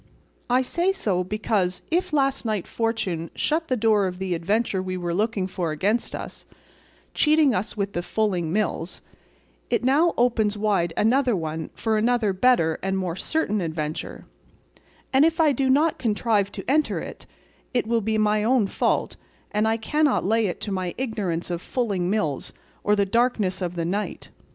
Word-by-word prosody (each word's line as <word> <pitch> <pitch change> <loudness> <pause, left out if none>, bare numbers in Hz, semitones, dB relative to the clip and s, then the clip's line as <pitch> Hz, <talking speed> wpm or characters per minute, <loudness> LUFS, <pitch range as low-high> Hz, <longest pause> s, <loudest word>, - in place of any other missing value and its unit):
I 250 +2 +3
say 345 +8 +1
so 195 - 0
because 195 -2 -1
if 360 +2 +1
last 275 -2 +1
night 215 -5 -1
fortune 200 -8 -2
shut 320 +1 0
the 255 - 0
door 215 -3 +3
of 180 -1 -5
the 190 -1 -2
adventure 195 +4 0
we 185 0 -4
were 175 -1 -2
looking 205 0 0
for 180 -3 -3
against 200 +10 0
us, - - -7 0.7
cheating 300 -3 +4
us 210 +3 -2
with 200 -1 -2
the 175 - -1
fulling 180 -4 -1
mills, 185 -3 -2 0.7
it - - +1
now 295 +7 +3
opens 225 -4 +2
wide 200 -5 +1
another 245 +1 +3
one 160 -2 -4
for 220 -1 0
another 225 -3 +2
better 185 -6 +3
and 195 0 -1
more 180 -3 -2
certain 215 - -1
adventure, 155 -2 -4 0.9
and 265 +2 +6
if 325 +1 +2
I 315 -2 +5
do 270 0 0
not 295 +4 +3
contrive 210 -3 +1
to - - -7
enter 300 +4 +2
it, - - -9 0.4
it 245 -3 0
will 230 0 +1
be 220 +1 0
my 210 0 +2
own 240 -1 +3
fault, 195 - 0 0.3
and 210 +1 +1
I 225 0 +2
cannot 295 +4 +1
lay 220 +2 +2
it 180 - -4
to 205 - -4
my 185 -2 -2
ignorance 200 -9 -2
of 170 0 -3
fulling 200 -8 -1
mills, 190 -10 -1 0.3
or 210 - +3
the 200 -1 +2
darkness 215 -3 +1
of 180 -1 -3
the 170 -1 -2
night. 200 +5 -3
210 Hz, 175 wpm, -24 LUFS, 185-245 Hz, 0.9 s, and